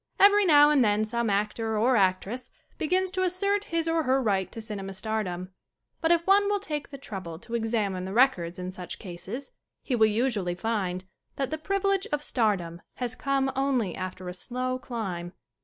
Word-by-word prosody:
Every 405 0 +7
now 295 -2 +7
and 280 -4 +5
then 210 0 +2
some 235 +1 -1
actor 215 +2 0
or 245 +4 +3
actress 195 +4 +1 0.3
be 315 - -1
gins 370 +2 +1
to 375 0 -1
assert 400 +3 +1
his 330 -1 -1
or 330 0 +2
her 265 -2 +2
right 195 -6 0
to - - -7
cinema 200 -3 -5
star 220 +2 -1
dom. 180 -1 -5 0.5
But 325 - +2
if 340 0 +3
one 400 +1 +5
will 410 0 +1
take 300 -7 -4
the 275 - -8
trouble 190 - -7
to 235 +7 -6
ex 225 -1 -1
amine 200 -5 0
the 190 - -5
records 195 -8 +3
in 180 0 -4
such 180 -2 -7
cases 205 +8 -7 0.3
he 255 - 0
will 220 -2 +5
usually 210 -5 0
find 185 -3 -2 0.3
that 270 0 -2
the 315 - -2
privilege 395 +2 0
of 295 0 -1
stardom 190 - 0
has 245 -1 -3
come 270 0 0
only 260 -9 +1
after 185 0 -6
a 180 - -4
slow 255 +6 -3
climb. 190 -9 -4
230 Hz, 195 wpm, -27 LUFS, 190-290 Hz, 0.5 s, Every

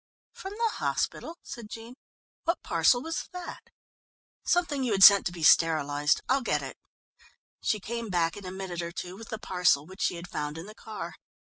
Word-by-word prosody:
"From 385 +1 -8
the 455 0 0
hospital?" 335 - -2
said 230 -4 -9
Jean. 230 +2 -9 0.5
"What 335 +2 0
parcel 245 -1 +3
was 325 0 -4
that?" 360 -1 -8 0.7
"Something 335 -6 +1
you 240 -4 +1
had 195 -1 +4
sent 200 -1 +9
to - - -4
be 170 -2 -7
sterilized. 150 -2 +4
I'll 265 +2 +2
get - - 0
it." - - -7 0.8
She 215 - 0
came 230 +2 -5
back 170 -3 +1
in 205 - -9
a - - -5
minute 185 -2 -5
or 170 0 -5
two 180 +1 -6
with 225 +3 -11
the 220 - -4
parcel 180 -8 +2
which 190 +4 -11
she - - +1
had 170 +1 -8
found 150 -2 -4
in 165 - -7
the 215 - -10
car. 215 -1 -8
200 Hz, 190 wpm, -28 LUFS, 170-245 Hz, 0.8 s, sent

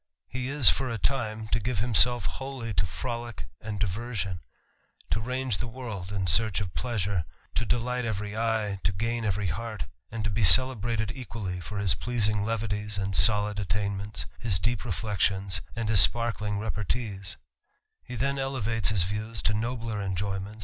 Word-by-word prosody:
He 125 +1 -3
is, 140 -3 +4
for 130 -1 +6
a 115 - -2
time, 110 -2 -1
to - - +2
give 120 +1 -2
himself 120 +2 +5
wholl; 135 -2 -4
to 85 0 +2
frolick 120 - -4 0.2
and 105 -1 -4
diversion, 100 -2 -2 0.7
to 110 - +2
range 125 -1 -1
the 120 - -2
world 110 -6 -6
in 95 -2 -1
search 100 +5 +4
pleasure, 100 -7 -1 0.3
to 115 - 0
delight 125 +1 0
every 105 -2 -3
eye, 110 -3 0
to 95 - +3
gain 115 +4 -1
every 105 -1 0
heart, 110 +5 -3 0.3
and 115 -1 -4
t 110 - 0
be 105 +2 +1
celebrated 115 +2 +4
equally 115 -8 -5
for 105 +4 -6
his 100 -5 +3
pleasing 105 +2 +1
levities 105 -1 -2
and 95 -1 -1
soli 105 -1 +4
attainments, 100 +1 -2
his 110 -6 +3
deep 115 +7 0
reflections 95 -3 0
and 115 -2 -2
his 105 -2 +5
sparkling 110 -2 +3 1.5
He 125 - -7
then 135 +3 0
elevates 120 -6 +1
his 100 -5 +4
views 105 +4 -3
to 100 - +3
nobler 115 -1 -2
enjoyments, 95 +1 -2
an. - - -15
110 Hz, 160 wpm, -28 LUFS, 100-120 Hz, 1.5 s, for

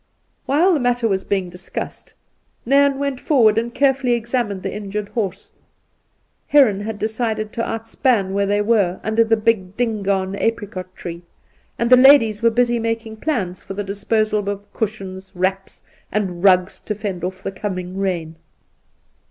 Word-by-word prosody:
While 330 +8 +4
the 310 - +2
matter 245 -2 +1
was 195 -2 0
being 190 -3 -2
discussed, 180 +1 -7 0.5
Nairn 280 +2 +4
went 280 -2 -2
forward 225 -7 +4
and 235 +1 -4
carefully 270 -1 +2
examined 235 -4 -2
the 195 - -3
injured 205 0 -5
horse. 200 -4 -4 1.0
Heron 260 -9 +5
had 210 +1 -5
decided 220 0 -2
to 235 - -2
outspan 225 -3 0
where 200 0 +1
they 205 +1 +1
were, 205 -5 +2
under 220 +2 +2
a 225 0 +3
big 210 -3 0
Dingaan 200 -5 0
apricot 195 -5 -3
tree, 170 0 -7 0.6
and 235 - 0
the 255 - +9
ladies 250 -6 +6
were 230 - +5
busy 240 +1 +1
making 225 -1 -3
plans 205 - -2
for 195 - -8
the 205 - -2
disposal 205 +1 0
of 205 0 -6
cushions, 195 -3 -5
wraps, 190 +2 -2 0.3
and 190 -4 -2
rugs 185 -1 +4
to 210 - -4
fend 195 -4 -5
off 185 +1 -4
the - - -3
coming 185 -2 -5
rain. 170 -5 -2
210 Hz, 155 wpm, -20 LUFS, 195-235 Hz, 1.0 s, the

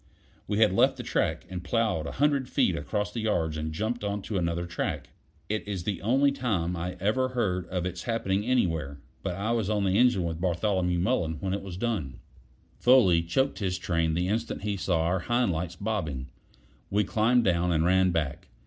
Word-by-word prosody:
We 105 - -1
had 110 -3 +4
left - - +3
the - - -5
track - - -1
and 90 -1 -6
plowed 105 -6 0
a - - -5
hundred 140 -2 +1
feet - - +2
across 105 +9 -2
the 115 - -4
yards 85 -8 0
and 80 0 -3
jumped 110 +8 -2
on 100 -1 -2
to 100 -2 -2
another 85 0 -1
track. 85 0 -4 0.4
It 105 0 -3
is 95 -4 -3
the 95 -2 -3
only 135 +6 +3
time 95 -11 -1
I 90 +2 -4
ever 110 +7 +1
heard 95 -8 -1
of 90 -1 -2
its 90 0 -4
happening 105 -4 -1
anywhere, 80 - 0 0.2
but 90 -3 -3
I 100 +5 -2
was 115 -4 0
on 105 -2 +1
the 95 +2 +2
engine 125 -7 +4
with 85 -1 -3
Bartholomew 90 0 +1
Mullen 85 -4 0
when 95 +2 -2
it 100 - -2
was 95 -2 -7
done. 95 - -2 0.6
Foley 120 -10 +5
choked 130 +12 0
his 95 -3 -1
train 85 -2 0
the 90 +2 0
instant 110 +1 -2
he 105 -1 -1
saw 90 -3 0
our 90 +3 +1
hind 120 +2 +1
lights 85 +1 -3
bobbing. 90 -12 -3 0.6
We 105 +2 +2
climbed 115 +4 +2
down, 90 -2 +2
and 80 -1 +2
ran 95 +1 +4
back. 80 0 -2
95 Hz, 200 wpm, -28 LUFS, 85-110 Hz, 0.6 s, Foley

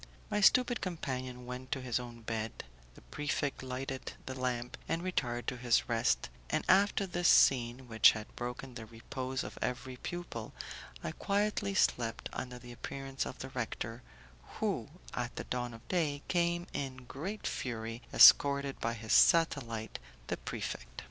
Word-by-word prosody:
My 210 0 +1
stupid 245 +4 +5
companion 130 -8 -4
went 125 +1 -7
to 135 - -2
his 125 -1 0
own 120 -1 -8
bed, 110 -1 -3 0.3
the - - -14
prefect 140 - -2
lighted 130 +1 -4
the 130 - -4
lamp 125 -2 -2
and 165 +1 0
retired 120 -10 -1
to 125 - -2
his 120 -1 +2
rest, 115 - +2 0.2
and - - 0
after 200 +1 +4
this 175 -1 0
scene, 125 0 +5
which 115 -1 +7
had 110 -1 -8
broken 125 +2 -5
the 115 -2 -8
repose 130 +3 -4
of - - -8
every 130 0 -3
pupil, 165 -9 -6 0.5
I 80 - -2
quietly 200 - 0
slept 115 -10 +1
until 125 -1 -5
the 120 0 -11
appearance 135 +2 -4
of - - -7
the 130 - -6
rector, 120 -2 -4 0.6
who, - - -1 0.2
at - - -3
the - - -4
dawn 125 -1 -2
of 115 +1 -13
day, 150 -6 0
came 175 -1 +1
in 130 -2 -4
great 180 - -5
fury, 115 -1 -3
escorted 140 -1 +7
by 115 - -1
his 110 -1 -2
satellite, 120 -9 +4 0.3
the - - -1
prefect. - - -5
130 Hz, 155 wpm, -33 LUFS, 120-145 Hz, 0.6 s, which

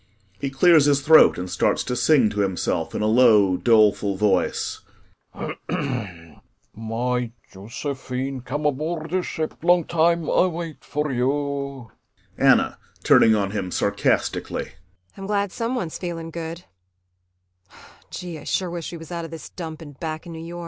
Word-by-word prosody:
He 140 - -2
clears 150 +2 +5
his 140 -1 +3
throat 155 +2 +6
and 90 +1 -4
starts 90 0 0
to 125 - -3
sing 125 -4 +4
to 105 - -4
himself 95 -3 -1
in - - -1
a - - +1
low, 110 -4 +5
doleful 105 -2 +3
voice: 100 -3 0 0.6
"My 95 - -5 1.1
Yosephine, 130 +4 -5
come 145 +4 -4
aboard 155 +3 -2
de 185 0 +1
ship. 160 -2 -5
Long 175 0 +4
time 170 0 +1
Ay 185 - +3
wait 165 -5 -6
for 150 0 -2
you." 140 -1 -2 0.4
ANNA - - +3 0.2
[Turning 110 -1 +6
on 100 -2 -1
him, 100 -3 -3
sarcastically. - - -1
130 Hz, 95 wpm, -23 LUFS, 105-150 Hz, 1.1 s, throat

